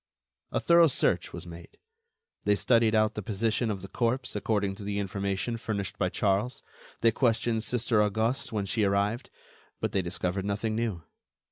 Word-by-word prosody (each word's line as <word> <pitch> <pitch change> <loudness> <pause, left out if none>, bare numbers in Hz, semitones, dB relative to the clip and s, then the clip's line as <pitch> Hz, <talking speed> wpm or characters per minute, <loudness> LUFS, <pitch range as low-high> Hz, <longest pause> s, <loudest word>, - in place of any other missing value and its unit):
A - - 0
thorough 170 -1 +6
search 90 - +1
was 85 0 -7
made; 85 0 -11 0.7
they 105 - +3
studied 115 0 +3
out 110 0 +3
the 105 - -4
position 110 +3 0
of 100 -3 -3
the - - -6
corpse 125 +5 -1
according 105 -2 0
to 100 - -8
the 100 0 -3
information 100 +3 -2
furnished 100 -5 -4
by 90 - +2
Charles; 105 +7 0 0.4
they 115 - +5
questioned 115 -2 +1
Sister 115 -2 +1
Auguste 110 +5 0
when 105 -3 -1
she 105 +3 0
arrived; 100 +5 0 0.5
but - - -1
they 95 - +1
discovered 90 +1 -2
nothing 105 +2 -1
new. 110 -7 -2
105 Hz, 165 wpm, -28 LUFS, 100-115 Hz, 0.7 s, thorough